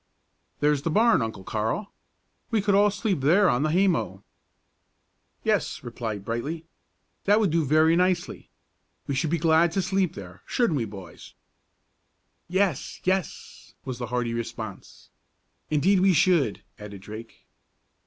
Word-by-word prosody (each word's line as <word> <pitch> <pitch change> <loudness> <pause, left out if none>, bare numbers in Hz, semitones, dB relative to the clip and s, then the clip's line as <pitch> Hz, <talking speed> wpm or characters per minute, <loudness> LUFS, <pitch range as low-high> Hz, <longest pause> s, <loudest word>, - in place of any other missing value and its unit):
"There's 145 -1 +2
the 165 - -2
barn, 225 - +4
Uncle 110 -4 -4
Carl. 110 - -2 0.6
We 225 - +1
could 200 0 +1
all 205 +1 +5
sleep 205 -3 -1
there 175 +9 +4
on 125 -5 +2
the 155 - +1
haymow." 150 - +1 1.2
"Yes," - - 0
replied 110 -4 -5
Brightly, 140 +9 -4 0.6
"that 205 +2 +4
would 205 -7 +2
do 165 0 +2
very 155 +3 +4
nicely. 180 0 0 0.6
We 140 - -3
should 135 +4 0
be 170 - +1
glad 165 0 +3
to 195 - +1
sleep 190 -1 0
there, 90 -2 -10
shouldn't 235 - +1
we, 120 - -1
boys?" 100 -4 -11 1.1
"Yes! 185 -4 -1
yes!" 185 -1 -3
was 130 -2 -5
the 120 - -4
hearty 120 -1 -2
response. 115 -3 -7 0.6
"Indeed 185 +6 +3
we 190 0 +4
should!" 160 - +2 0.2
added 100 -2 -9
Drake. 110 +3 -11
155 Hz, 140 wpm, -25 LUFS, 115-185 Hz, 1.2 s, all